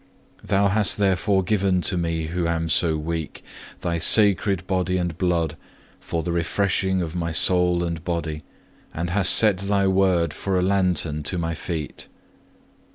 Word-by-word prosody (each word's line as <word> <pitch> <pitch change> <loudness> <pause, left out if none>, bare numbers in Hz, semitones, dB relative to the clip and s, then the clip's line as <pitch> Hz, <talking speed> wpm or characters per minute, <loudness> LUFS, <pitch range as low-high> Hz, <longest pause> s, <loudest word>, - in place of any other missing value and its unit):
Thou 100 0 +1
hast 105 0 +3
therefore 95 0 +1
given 95 -1 +1
to 95 - 0
me 85 -2 -2
who 85 0 -2
am 80 0 -2
so 80 -1 +1
weak, 80 0 -5 0.4
Thy 85 -1 -2
sacred 100 0 +4
Body 90 -1 -1
and 85 -3 -2
Blood, 85 -3 -1 0.4
for 80 -1 -4
the 85 - -3
refreshing 95 +2 0
of 80 0 -6
my 85 -1 -2
soul 90 +1 +2
and 85 -2 -4
body, 85 -3 -3 0.5
and 85 +2 -3
hast 95 -1 +2
set 105 -5 +4
Thy 100 0 0
Word 95 -4 +1
for 95 -1 -2
a 90 - +1
lantern 90 -5 0
to 90 +5 -2
my 85 -1 -2
feet. 80 -2 -6
90 Hz, 160 wpm, -23 LUFS, 85-95 Hz, 0.5 s, sacred